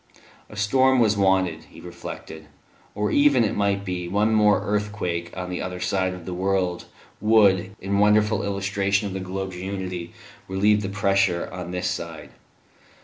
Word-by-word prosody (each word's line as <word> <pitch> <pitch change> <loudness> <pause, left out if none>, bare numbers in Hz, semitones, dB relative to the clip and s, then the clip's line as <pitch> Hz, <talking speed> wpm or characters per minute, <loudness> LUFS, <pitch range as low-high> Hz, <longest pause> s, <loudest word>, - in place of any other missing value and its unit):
A - - -11
storm 130 +6 +3
was 110 -3 +3
wanted, 95 -4 +1
he - - -15
reflected; - - -9 0.5
or 105 0 -1
even, 145 -4 +4
it 105 - -1
might 100 -1 0
be, 90 -2 -3
one 105 +4 +1
more 105 -1 +4
earthquake 105 -5 -2
on 90 0 -4
the 90 - -3
other 90 -1 -5
side 90 +1 0
of 90 -2 -11
the 90 - -5
world 95 -1 -1 0.3
would, 100 -3 +3
in 100 +1 -1
wonderful 105 0 +3
illustration 100 0 0
of 95 - -6
the 95 - -3
globe's 95 0 -5
unity, 90 -2 -5 0.4
relieve 105 +2 +2
the 95 - -3
pressure 100 -3 +1
on 90 -1 -6
this 90 0 -2
side. 85 -3 -5
95 Hz, 160 wpm, -24 LUFS, 90-105 Hz, 0.5 s, even